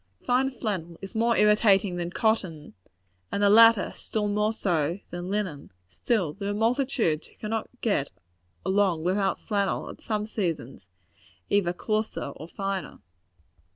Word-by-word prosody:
Fine 255 +2 +2
flannel 190 -9 -4
is 195 - -9
more 230 +1 +2
irritating 210 -3 +4
than 175 0 -2
cotton; 185 -7 -1 0.6
and 205 - 0
the 200 - +6
latter, 225 -1 +6 0.2
more 210 0 +1
so 170 -6 0
than 175 +1 -5
linen. 190 -8 -3
Still, 160 - -1
there 200 +2 -4
are - - 0
multitudes 225 - +1
who - - -23
cannot 220 0 -3
get 200 - +1 0.6
along 190 -4 +2
without 195 +2 +1
flannel, 200 -2 -1
at - - -14
some 210 -2 -2
seasons, 165 - -4 0.6
either 200 -4 +3
coarser 215 -2 -2
or 155 - -9
finer. 195 +1 -4
200 Hz, 135 wpm, -27 LUFS, 175-220 Hz, 0.6 s, the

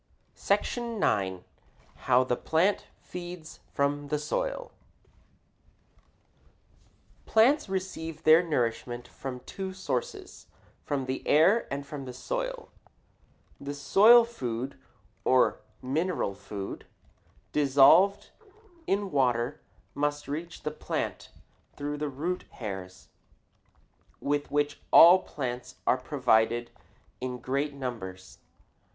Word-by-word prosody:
SECTION 235 -2 -1
IX. 95 -2 0 0.6
HOW 125 0 +5
THE 125 -1 0
PLANT 170 +10 +1 0.2
FEEDS 175 -2 -8
FROM 145 0 -1
THE 150 +1 0
SOIL - - -3 2.6
Plants 250 +4 +4
receive 185 -4 -4
their 160 +2 +7
nourishment 120 -6 -2
from 125 -2 -7
two 190 +7 -6
sources 130 -10 -5 0.4
from 140 -2 -2
the 130 +1 -3
air 175 +10 +4
and 140 +1 -4
from 140 -1 -7
the 125 - -7
soil. - - -4 0.9
The 140 +1 -6
soil 210 +12 +6
food, 130 - -5 0.5
or - - +3 0.2
mineral 155 - -1
food, 100 0 -7 0.6
dissolved 150 +7 +5 0.6
in 200 0 0
water, 125 -1 +1 0.3
must 145 0 -2
reach 165 +4 -6
the 150 - -2
plant 150 - -4 0.5
through 145 +1 -4
the 150 -1 -2
root 165 +7 -3
hairs 95 -5 -7 1.1
with 145 0 -1
which 145 0 0
all 175 +3 +9
plants 125 -6 -6
are - - +3
provided 120 -3 +1 0.5
in 125 0 -4
great 140 +3 -2
numbers. 95 -9 -7
145 Hz, 100 wpm, -28 LUFS, 125-175 Hz, 2.6 s, all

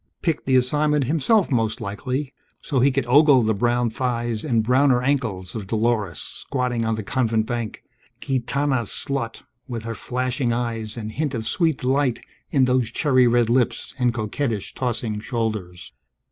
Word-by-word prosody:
Picked 165 -5 -1
the 130 - +3
assignment 150 +3 +2
himself, 165 - +2
most 115 -3 0
likely, 125 +7 -3 0.3
so 135 - -1
he 135 +3 +5
could 135 -1 0
ogle 140 0 +6
the 110 0 +2
brown 120 +2 +1
thighs 120 -2 -2
and 115 -7 +1
browner 125 +1 +3
ankles 115 -10 -1
of 105 -4 -5
Dolores 110 -4 0
squatting 125 -4 -3
on 110 0 +1
the 110 - -4
Convent 110 0 0
bank, 120 -2 -4 0.4
gitana 135 0 0
slut 125 0 -3 0.2
with 120 -4 -5
her 115 0 -4
flashing 125 +1 -2
eyes 115 -2 -3
and 110 -1 -5
hint 145 +1 -2
of 110 -1 -3
sweet 160 -5 +1
delight 130 -1 +1 0.3
in 135 -2 +3
those 125 -2 +1
cherry 130 0 +3
red 120 -1 +3
lips 120 +1 0
and 125 -1 +3
coquettish 110 0 -3
tossing 115 -4 -2
shoulders. 110 -6 -4
120 Hz, 160 wpm, -23 LUFS, 115-135 Hz, 0.4 s, ogle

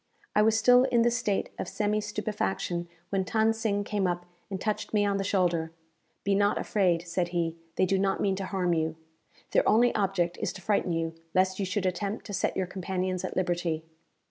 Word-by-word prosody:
I 210 - +6
was 220 +1 +4
still 245 +3 +6
in 240 -3 +3
this 240 0 +2
state 215 -4 -1
of - - -3
semi 210 0 0
stupefaction 180 - -2 0.2
when 195 -1 +1
Than 220 +3 +2
Sing 215 -2 -1
came 200 -2 0
up, 175 0 -2 0.2
and 190 -2 -4
touched 215 +1 -2
me 205 -1 +4
on 200 -1 +1
the 195 - -1
shoulder. 175 -4 +1 0.5
"Be 200 - +2
not 205 +1 +3
afraid," 180 -4 +1
said 175 +1 0
he; 170 -2 -1 0.2
"they - - +3
do 190 +1 +1
not 195 0 +1
mean 195 -1 +1
to 195 - -3
harm 185 -3 0
you. 160 -1 0 0.6
Their - - +3
only 240 +2 +5
object 190 -4 0
is - - -1
to 195 - -10
frighten 200 -3 +1
you, 165 0 -1 0.2
lest 185 +1 +2
you 195 - 0
should 195 0 -1
attempt 195 +3 -2
to 205 - -7
set - - 0
your 190 - +1
companions 185 0 -3
at 185 - -4
liberty." 175 -3 -1
195 Hz, 205 wpm, -28 LUFS, 175-210 Hz, 0.6 s, I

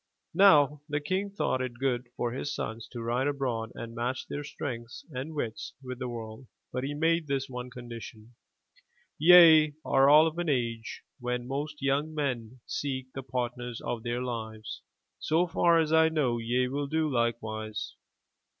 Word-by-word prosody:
'* - - -53
Now 150 -6 +6
the 150 0 0
King 185 +7 -1
thought 195 -9 -1
it 125 -2 -4
good 125 -2 0
for 120 - -1
his 135 +4 -3
sons 115 0 -5
to 120 -2 -7
ride 120 +4 0
abroad 125 -6 -2
and 115 0 -7
match 120 +2 -2
their 145 - -5
strength 120 -5 -6
and 140 +4 -5
wits 115 -6 -4
with 125 -1 -6
the 125 -1 -3
world, 115 +1 -7 0.3
but 125 - -2
he 145 +2 -3
made 165 +1 +1
this 135 -1 -1
one 125 -1 -6
condition: 120 -2 -10 0.9
"Ye 160 -3 +8
are 135 +1 +5
all 150 +2 +8
of 165 +1 -2
an 175 -2 -1
age 115 -4 -2 0.2
when 125 0 -3
most 145 +2 -4
young 145 +3 0
men 125 -5 -3
seek 130 -2 -4
the 135 - -5
partners 125 -2 -4
of 120 - -4
their 120 +1 -2
Uves. 110 -3 -5 0.4
So 165 +3 +2
far 170 -1 +3
as 160 -1 +2
I 160 0 +6
know, 135 -7 +1
ye 125 +2 +1
will 140 +2 -2
do 160 +2 +1
likewise. 110 -4 -2
130 Hz, 170 wpm, -29 LUFS, 120-150 Hz, 0.9 s, Ye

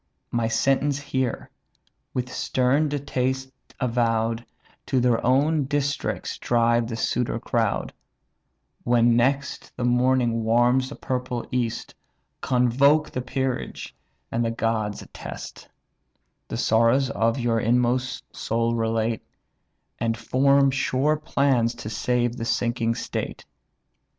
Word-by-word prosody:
My 115 -1 0
sentence 135 +4 +1
hear: 130 -4 -3 0.6
with 125 0 -3
stern 135 +4 +1
distaste 130 -2 -2 0.3
avow'd, 115 -2 0 0.4
To 130 - +2
their 120 -2 +2
own 140 +4 +3
districts 145 0 -2
drive 120 -1 +2
the 115 - -4
suitor 115 +1 -1
crowd; 115 -3 -1 0.9
When 120 -1 +4
next 135 +4 0
the 125 - -2
morning 125 -1 +2
warms 120 +3 +3
the 145 - -8
purple 125 -2 -3
east, 120 -2 -2 0.5
Convoke 135 +5 +3
the 125 - -3
peerage, 130 0 -3 0.4
and 115 - 0
the 115 - 0
gods 115 -2 -1
attest; - - -9 0.8
The - - -4
sorrows 115 +4 +3
of 115 +2 +1
your 120 -2 +1
inmost 125 +2 +1
soul 115 +1 0
relate; 115 -1 0 0.8
And 115 -1 0
form 140 +3 +3
sure 135 +2 +1
plans 135 -6 +1
to 110 - -7
save 120 +2 0
the 115 - -3
sinking 115 -1 0
state. - - -5
125 Hz, 115 wpm, -24 LUFS, 115-130 Hz, 0.9 s, When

